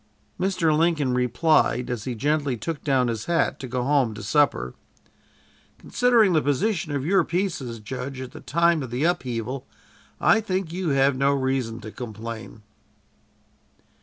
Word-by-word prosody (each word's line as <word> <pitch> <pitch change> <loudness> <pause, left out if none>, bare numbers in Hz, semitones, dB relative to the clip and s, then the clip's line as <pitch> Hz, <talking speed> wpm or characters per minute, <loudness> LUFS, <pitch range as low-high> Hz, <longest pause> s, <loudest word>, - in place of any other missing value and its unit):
Mr. 180 -4 +1
Lincoln 155 -5 +2
replied, 125 +1 +2
as 115 -3 -4
he 125 -2 -3
gently 145 +1 0
took 160 +5 -5
down 135 -4 +2
his 115 -2 -3
hat 170 -1 +1
to 130 - -6
go 125 0 -2
home 135 -5 +2
to 105 - -8
supper: 100 - +1 1.0
"Considering 235 -6 +3
the 155 - +3
position 165 +4 0
of 135 -1 -2
your 190 +2 +3
pieces, 165 -9 -2
judge, 130 +4 -6
at 130 -1 -7
the 155 - -11
time 170 0 +2
of 130 - -5
the 125 +4 -2
upheaval, 130 -6 -2 0.5
I 225 - +4
think 185 -5 -2
you 180 -2 -2
have 135 -1 +3
no 140 +2 +2
reason 130 -4 -1
to 110 0 -8
complain." 115 -1 -8
140 Hz, 155 wpm, -24 LUFS, 125-165 Hz, 1.0 s, I